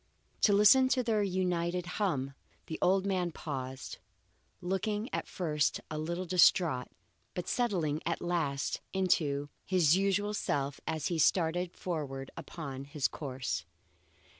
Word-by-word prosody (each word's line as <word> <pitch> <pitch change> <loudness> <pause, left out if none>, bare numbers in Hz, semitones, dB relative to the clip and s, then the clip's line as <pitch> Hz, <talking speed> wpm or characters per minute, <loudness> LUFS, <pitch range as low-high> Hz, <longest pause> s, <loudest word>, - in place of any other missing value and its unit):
To 210 - +5
listen 220 +6 +7
to 255 -1 +2
their 220 -3 +1
united 180 -2 0
hum, 170 -8 -1 0.3
the 160 - -5
old 190 +1 +3
man 185 -3 0
paused, 135 -4 -6 0.6
looking 205 +5 -2
at - - -2
first 150 -5 0
a 155 - -3
little 170 +4 -3
distraught, 170 -6 +4 0.5
but 180 -1 -4
settling 175 -11 0
at 170 0 -1
last 160 -5 -1
into 150 -7 +1
his 175 -4 +4
usual 200 +2 +1
self 140 -8 -1
as 155 -3 -1
he 170 -2 -1
started 175 +2 +2
forward 140 -6 -4
upon 140 -5 -7
his 140 -1 0
course. 130 -3 -4
170 Hz, 130 wpm, -31 LUFS, 145-190 Hz, 0.6 s, listen